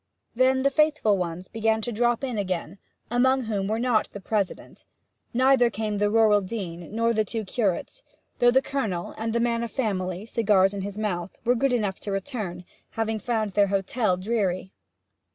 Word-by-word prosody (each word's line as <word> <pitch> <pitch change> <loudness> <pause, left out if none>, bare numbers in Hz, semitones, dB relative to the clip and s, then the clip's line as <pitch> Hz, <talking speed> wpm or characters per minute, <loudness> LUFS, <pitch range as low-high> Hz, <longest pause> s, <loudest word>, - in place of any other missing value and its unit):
Then 260 +2 +3
the 275 - +3
faithful 300 -8 +3
ones 180 0 -4
began 220 0 0
to 240 - -2
drop 240 +2 +1
in 250 -5 -2
again 185 -1 -3 0.3
among 260 +2 +3
whom 205 -4 -2
were 215 +2 0
not 235 -2 +1
the 200 - -6
President; 200 -1 -3 0.5
neither 255 -1 +4
came 210 -2 -3
the 205 0 +2
rural 215 -1 +4
dean, 185 -5 -6
nor 230 +1 +2
the 215 -1 +2
two 220 +1 -4
curates, 205 - -2 0.4
though 245 - +6
the 265 +2 +4
Colonel, 215 -11 -3
and 225 +1 -3
the 235 - +1
man 235 0 +1
of 235 - -3
family, 190 -6 -2
cigars 205 -4 +3
in 200 - -4 0.2
mouth, 185 -4 -3
were 245 - +4
good 265 +2 +1
enough 210 -6 0
to 205 - -5
return, 195 -5 -4 0.2
having 225 -1 -2
found 220 -1 -1
their 200 +1 +3
hotel 195 0 0
dreary. 190 -2 -1
220 Hz, 175 wpm, -25 LUFS, 195-240 Hz, 0.5 s, though